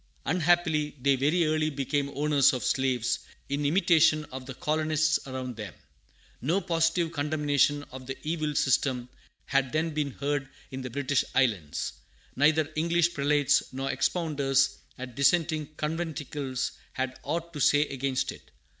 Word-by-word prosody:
Unhappily, 160 -3 +2
they 140 +1 +3
very 150 +6 +2
early 155 0 +1
became 140 0 -1
owners 145 -1 +4
of 130 - -3
slaves, 130 -3 +1 0.3
in 145 +1 0
imitation 160 -2 +4
of 130 0 -7
the 130 - -7
colonists 155 +1 +1
around 130 -2 -5
them. 105 -2 -7 0.7
No 165 +10 +1
positive 165 -1 +1
condemnation 145 -1 +1
of 130 -1 -9
the 135 - -5
evil 155 -1 -2
system 130 -2 +1 0.4
had 135 -2 +1
then 160 +1 0
been 150 -2 -1
heard 140 0 -2 0.2
in 130 0 -5
the 130 - -5
British 140 +2 0
islands. 105 - 0 0.4
Neither 155 +2 +3
English 170 +2 +2
prelates 145 -2 +2
nor 135 +1 -2
expounders 140 -6 +1 0.2
at 130 -1 -7
dissenting 155 +3 +2
conventicles 150 -4 -3 0.2
had 130 0 -3
aught 170 +3 -3
to 150 - -6
say 145 +1 +4
against 135 -2 -2
it. - - -14
145 Hz, 140 wpm, -28 LUFS, 135-155 Hz, 0.7 s, owners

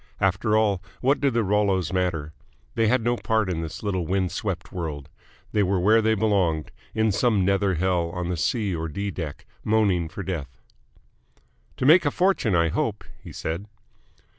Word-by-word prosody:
After 95 +3 +2
all, 105 -4 +2 0.2
what 135 +3 +2
did 140 -4 +1
the 115 - +3
Rollos 95 -3 +1
matter? 85 -5 -1 0.4
They 115 - +2
had 120 +1 +2
no 120 +1 +1
part 110 -5 0
in 80 -2 -2
this 80 +5 -6
little 95 -5 -1
wind 95 -1 0
swept 95 -5 -4
world: 75 -6 -5 0.4
they 105 - +2
were 95 -1 +1
where 110 +5 +4
they 110 0 +2
belonged, 95 - +1 0.2
in 110 0 +2
some 105 -2 +2
nether 100 -1 +2
hell 85 0 0
on 90 0 -4
the 90 - -1
C. 100 +4 0
or 80 0 -3
D. 100 +5 -3
deck, 80 -6 -6 0.2
moaning 100 -6 +2
for 100 - -6
death. 85 -8 -5 1.2
"To - - -1
make 165 +6 +7
a 145 - +2
fortune, 175 - +1
I 85 -1 +3
hope," - - -2 0.2
he - - -9
said. 85 +6 -4
95 Hz, 180 wpm, -25 LUFS, 85-110 Hz, 1.2 s, make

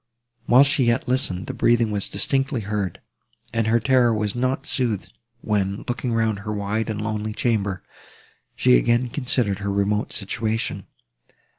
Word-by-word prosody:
While 125 +3 +7
she 140 -2 +2
yet 120 +2 +1
listened, 125 -8 0
the - - -5
breathing 115 -2 +2
was 100 -1 -2
distinctly 135 -2 +1
heard, 100 -3 -3 0.5
and 115 -1 0
her 115 +1 +3
terror 120 +1 +3
was 105 -2 -1
not 130 +2 -1
soothed, 115 -7 -1 0.3
when, 100 -2 -1
looking 120 0 -2
round 110 -3 0
her 105 +1 -5
wide 105 +2 -2
and 105 -1 -3
lonely 110 0 -3
chamber, 105 -5 -1 0.7
she 60 - +5
again 120 - +1
considered 120 -6 0
her 100 0 -3
remote 100 +1 0
situation. 110 +2 -3
110 Hz, 150 wpm, -23 LUFS, 100-120 Hz, 0.7 s, While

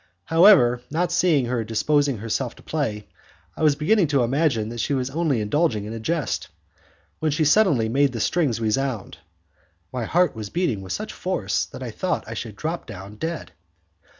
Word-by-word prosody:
However, 165 -9 +6
not 170 +4 0
seeing 155 -8 +3
her 120 -1 -1
disposing 140 +5 +1
herself 115 +3 -3
to - - -17
play, 110 -10 -3 0.5
I - - -8
was 150 -2 +4
beginning 170 +5 +2
to 140 -3 +2
imagine 125 -4 +1
that 120 0 -6
she 140 - 0
had 130 0 -2
only 160 -2 +1
been 110 - -1
indulging 110 -3 0
in 110 - -6
a 115 - -5
jest, 155 +6 -2 0.7
when 155 - 0
she 155 +2 +1
suddenly 150 - +4
made 135 +4 +2
the 120 - -5
strings 140 -2 +1
resound. 115 -4 -2 0.7
My 125 -3 -2
heart 175 +5 +2
was 110 -2 -6
beating 140 - -1
with 95 -1 -8
such - - -4
force - - -1
that - - -9
I - - -5
thought - - -2
I - - -5
should - - -6
drop - - -4
down 100 +3 -9
dead. 165 +5 -4
135 Hz, 185 wpm, -23 LUFS, 115-160 Hz, 0.7 s, However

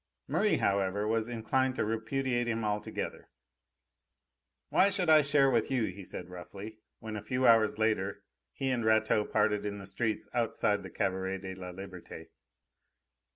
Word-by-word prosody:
Merri, - - +2
however, 100 +1 +1
was 115 +1 0
inclined 130 +3 0
to - - 0
repudiate 120 +3 -1
him 115 -1 -1
altogether. 105 0 -3 1.4
"Why 195 - +5
should 185 -4 +2
I 155 -1 +8
share 140 -1 +3
with 115 -4 +2
you?" 130 -4 +1
he 100 +1 -9
said 90 - -7
roughly, 100 +4 -9 0.2
when, 110 -1 -7
a 105 - -4
few 125 +4 -1
hours 115 -3 +5
later, 105 -3 0 0.3
he 135 - -2
and 120 -2 0
Rateau 110 -1 +3
parted 105 -1 +1
in 100 -1 -3
the 100 - -8
street 110 +2 -2
outside 110 -3 +1
the 95 - -8
Cabaret 95 +1 -1
de 95 0 -7
la 90 -1 -8
Liberte. 90 -3 -9
110 Hz, 155 wpm, -31 LUFS, 100-120 Hz, 1.4 s, I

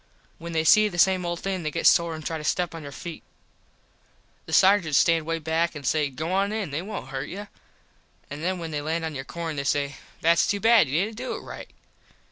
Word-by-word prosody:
When 170 0 -7
they 160 -1 +1
see 215 +7 +6
the 175 - -8
same 185 0 +3
old 170 0 -3
thing 190 -2 -2
they 155 - -2
get - - -3
sore 170 -1 +4
and 155 -1 -9
try 160 -1 -3
to - - -8
step 175 +2 0
on 165 - -7
your 145 -1 -8
feet. 165 +4 -8 1.3
The - - -8
sargents 185 -7 +5
stand 165 -2 +3
way 165 0 0
behind 165 +1 -1
an 145 - -7
say 150 +2 +1
"Go 155 +6 -4
on 195 +2 +1
in. 215 -8 -3
They 150 +3 -2
wont 195 -8 -6
hurt 135 0 -5
you." 205 +3 -7 0.8
An 145 +2 -7
then 185 +2 -1
when 165 -2 -6
they 150 -1 -2
land 160 +2 -2
on 160 - -4
your 135 -1 -6
corn 165 -1 -5
they 140 - -1
say 140 0 -1 0.2
"Thats 170 +1 +4
to 205 - 0
bad. 225 - +5
You 160 +8 +1
didnt 220 0 -8
do 255 +1 -4
it - - -7
right." - - -9
165 Hz, 240 wpm, -25 LUFS, 150-185 Hz, 1.3 s, see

